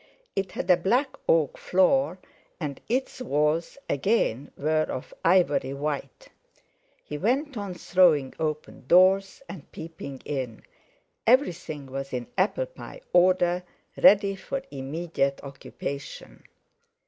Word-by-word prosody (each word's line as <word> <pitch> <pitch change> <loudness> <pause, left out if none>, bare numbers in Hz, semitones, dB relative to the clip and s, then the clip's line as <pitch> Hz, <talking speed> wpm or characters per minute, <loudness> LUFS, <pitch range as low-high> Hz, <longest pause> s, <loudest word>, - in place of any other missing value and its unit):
It 195 -1 -2
had - - -4
a 180 - +6
black 250 +10 +1
oak 160 -4 +2
floor, 190 +3 +2 0.4
and 145 -5 -5
its 255 +1 -1
walls, 155 - 0
again, 145 - 0
were 155 +2 +1
of 130 - -6
ivory 155 -6 +3
white. 140 -2 -4 0.7
He 150 - -6
went 265 - 0
on 200 -4 -5
throwing 170 -8 +3
open 155 -4 -4
doors, 190 - +4
and 160 -8 -10
peeping 160 -4 -8
in. 130 -6 -4 0.6
Everything 175 - +2
was 135 +1 -6
in 125 -1 -3
apple 210 - +1
pie - - -11
order, 180 0 +4 0.3
ready 200 -1 +5
for 270 +7 -5
immediate 140 0 -2
occupation. 140 0 -8
170 Hz, 115 wpm, -26 LUFS, 140-195 Hz, 0.7 s, a